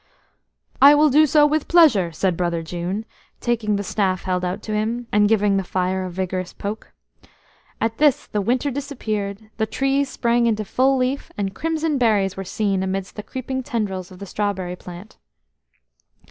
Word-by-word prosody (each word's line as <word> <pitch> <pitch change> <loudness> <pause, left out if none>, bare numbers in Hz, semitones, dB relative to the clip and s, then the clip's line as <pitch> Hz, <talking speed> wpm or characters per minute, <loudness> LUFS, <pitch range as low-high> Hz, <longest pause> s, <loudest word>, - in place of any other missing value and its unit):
"I 285 +2 +9
will 300 0 +4
do 305 +3 +6
so 295 +1 +5
with 300 0 0
pleasure," 275 - +5
said 180 +2 0
Brother 170 -1 -1
June, 175 +6 -4 0.3
taking 225 -3 0
the 200 - -2
staff 190 -2 -1
held 180 -1 -1
out 180 +3 -3
to 215 - -4
him, 225 +3 -1
and 210 0 +4
giving 205 -2 +3
the 195 - 0
fire 185 +1 -1
a - - -4
vigorous 185 0 -3
poke. 210 +2 -6 0.9
At 225 0 -1
this, 295 -1 +3
the 210 - -2
winter 255 +7 0
disappeared, 220 -7 -4
the 220 -1 0
trees 270 +3 0
sprang 235 -1 +1
into 215 -2 0
full 265 +6 +2
leaf, 255 +2 -1
and 195 -2 -2
crimson 320 -1 -1
berries 205 -5 +2
were 195 - -5
seen 195 0 -1
amidst 190 0 -3
the 210 - -5
creeping 260 +3 -4
tendrils 200 -7 -3
of 185 - -13
the 200 - -8
strawberry 190 -2 -2
plant. 180 +4 -11
210 Hz, 175 wpm, -22 LUFS, 190-255 Hz, 0.9 s, I